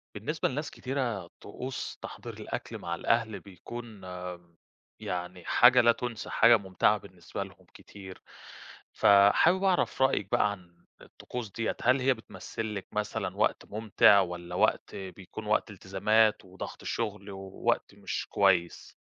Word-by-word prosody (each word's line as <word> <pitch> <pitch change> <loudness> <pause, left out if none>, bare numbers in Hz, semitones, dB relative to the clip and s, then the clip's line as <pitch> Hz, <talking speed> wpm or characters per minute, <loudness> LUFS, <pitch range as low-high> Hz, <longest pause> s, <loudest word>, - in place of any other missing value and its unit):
بالنسبة 145 +10 -1
لناس 150 +3 -4
كتيرة، 125 -9 -3
طقوس 125 +5 -6
تحضير - - -8
الأكل - - -6
مع 85 0 -4
الأهل 115 +4 0
بيكون 110 +3 -10 1.0
يعني 90 0 -5
حاجة 125 +1 +6
لا 120 0 +6
تُنسى 120 -2 -5
حاجة 115 +1 +6
مُمتعة 95 -3 +2
بالنسبة - - -7
لهم - - -15
كتير، 95 -2 -12 0.7
فحابب 100 - +5
أعرف 185 -7 +1
رأيِك 130 -7 +2
بقى 105 - +3
عن 85 -3 -13 0.2
الطقوس 120 -5 -8
دِيّة 115 +2 -2
هل 125 +3 +4
هي 135 +1 +4
بتمثل 110 -1 -6
لِك 100 - -6
مثلًا 105 0 -3
وقت - - +1
مُمتع 105 -1 +4
والّا 90 -1 -3
وقت - - +1
بيكون 95 +3 -8
وقت 105 0 +1
إلتزامات 100 +3 +2
وضغط 95 +1 -8
الشُغل 105 -3 -3
ووقت 95 0 -2
مش - - -4
كويس؟ 90 -4 +1
105 Hz, 130 wpm, -29 LUFS, 95-120 Hz, 1.0 s, حاجة